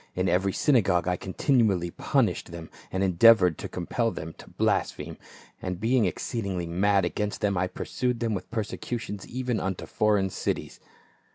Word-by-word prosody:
In 90 +1 0
every 95 +3 +2
synagogue 100 - +2
I 90 - +2
continually 95 - +1
punished - - 0
them, 85 -1 -9 0.2
and 95 +1 0
endeavored 90 -2 +5
to - - -5
compel 115 +6 -1
them 80 -6 -6
to - - -12
blaspheme; - - -1 0.5
and 90 -1 -4
being 115 +1 +2
exceedingly 95 0 -2
mad 95 +4 +2
against 105 -1 -3
them, 100 -1 +1
I 90 +1 +1
pursued 125 +5 -2
them 115 -1 0
with 95 -3 -5
persecutions 110 -2 -4
even 125 -3 -2
unto 95 -1 -3
foreign 105 -3 +1
cities. - - -3
100 Hz, 155 wpm, -27 LUFS, 90-115 Hz, 0.5 s, endeavored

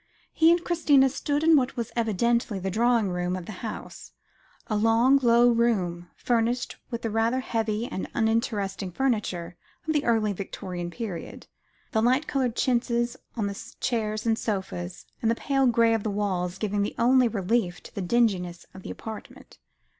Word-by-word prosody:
He 325 0 +5
and 345 0 +3
Christina 290 -6 +4
stood 290 +3 -1
in 325 0 +6
what 265 -2 +1
was 235 -2 -3
evidently 235 -1 +1
the 190 0 -3
drawing 230 0 +2
room 180 0 -1
of 185 -2 -6
the - - -7
house 220 -2 -7 0.5
a 215 - -2
long 225 +5 +4
low 240 0 +5
room, 185 -7 0
furnished 240 +1 0
with 235 -2 -5
the 225 - -1
rather 225 +4 +1
heavy 225 -2 -1
and 190 - -5
uninteresting 220 -4 0
furniture 180 -7 -1 0.3
of 315 - +1
the 295 -1 +1
early 220 -3 +2
Victorian 180 -2 -5
period, 195 -3 -6 0.5
the 220 - +2
light 255 +6 +3
coloured 260 -6 -1
chintzes 240 -1 +1 0.2
on 215 - 0
the 200 -1 -6
chairs 215 -3 -1
and 225 -1 +1
sofas, 190 -4 -4 0.2
and 225 - +2
the 230 - +2
pale 270 +1 +1
grey 230 -1 +4
of 225 - +1
the 215 - -2
walls, 190 -3 -1
giving 205 0 -1
the 205 - -2
only 250 +1 +4
relief 200 -3 -1
to - - -13
the 200 - -4
dinginess 185 -4 0
of 190 - -10
the - - -8
apartment. 220 -1 -9
225 Hz, 170 wpm, -26 LUFS, 195-240 Hz, 0.5 s, in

